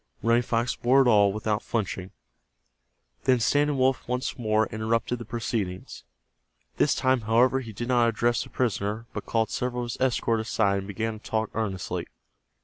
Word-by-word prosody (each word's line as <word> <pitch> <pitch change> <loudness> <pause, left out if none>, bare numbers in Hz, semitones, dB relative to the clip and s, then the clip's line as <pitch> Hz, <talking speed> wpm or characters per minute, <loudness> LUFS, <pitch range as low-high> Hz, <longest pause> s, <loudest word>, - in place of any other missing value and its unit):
Running 115 +1 +4
Fox 120 +1 -1
bore 130 +3 +4
it - - +1
all 105 -4 +5
without 105 +1 -1
flinching. 95 -4 -3 1.2
Then 125 -1 +4
Standing 145 +4 +2
Wolf 130 0 +2
once 125 +1 -2
more 110 -2 +1
interrupted 115 +2 -1
the 120 - -7
proceedings. 105 -5 -4 0.7
This - - +3
time, 130 -1 +2
however, 120 +4 +3
he 115 -4 -7
did 120 +3 -5
not 120 -2 +4
address 120 +1 +1
the - - -13
prisoner, 110 -2 -1
but - - -6
called 110 -1 0
several 125 0 -2
of 120 - -4
his - - -8
escort 120 -3 +1
aside 105 -3 +1
and 95 - -7
began 110 +1 -3
to - - -13
talk 110 -1 -1
earnestly. 100 -5 -3
115 Hz, 170 wpm, -26 LUFS, 110-125 Hz, 1.2 s, all